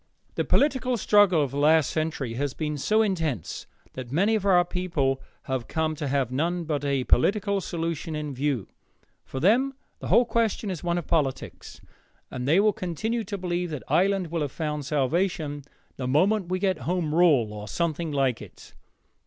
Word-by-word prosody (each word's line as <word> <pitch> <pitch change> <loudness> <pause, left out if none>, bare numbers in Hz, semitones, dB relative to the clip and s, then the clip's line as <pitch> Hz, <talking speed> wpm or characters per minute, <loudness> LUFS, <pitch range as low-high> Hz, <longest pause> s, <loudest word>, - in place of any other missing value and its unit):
The - - -1
political 260 -4 +2
struggle 200 -6 +4
of 135 - -3
the 140 - -3
last 155 0 +4
century 155 -6 -2
has 140 +2 -2
been 150 -1 -2
so 215 +10 +2
intense 160 - -2 0.3
that 125 -2 -7
many 195 +9 +2
of 205 -2 0
our 180 -2 +5
people 165 -8 -1 0.2
have 130 -3 -3
come 160 -1 -1
to 145 - -3
have 135 -2 0
none 170 +6 -1
but 150 -3 -2
a 140 -2 0
political 200 - +2
solution 165 -2 -3
in 150 -2 -4
view. 135 -5 -1 0.6
For 135 - -6
them 245 - +3 0.2
the - - -6
whole 245 - +5
question 225 -3 0
is 175 - -6
one 175 0 0
of 175 - -3
politics, 145 -5 -2 0.5
and 125 0 -4
they 160 +6 +4
will 210 +1 +4
continue 220 +7 -2
to 200 +1 -4
believe 180 -1 -2
that 150 -5 -5
Ireland 190 -2 +1
will 170 -2 -1
have 145 -3 -2
found 150 -3 -3
salvation 150 0 -1 0.3
the 130 - -3
moment 180 +7 +2
we 185 - 0
get 185 -3 0
Home 175 -4 -1
Rule 145 -11 +4
or 105 0 -7
something 165 +5 -2
like 135 -4 0
it. - - -13
160 Hz, 180 wpm, -26 LUFS, 140-190 Hz, 0.6 s, our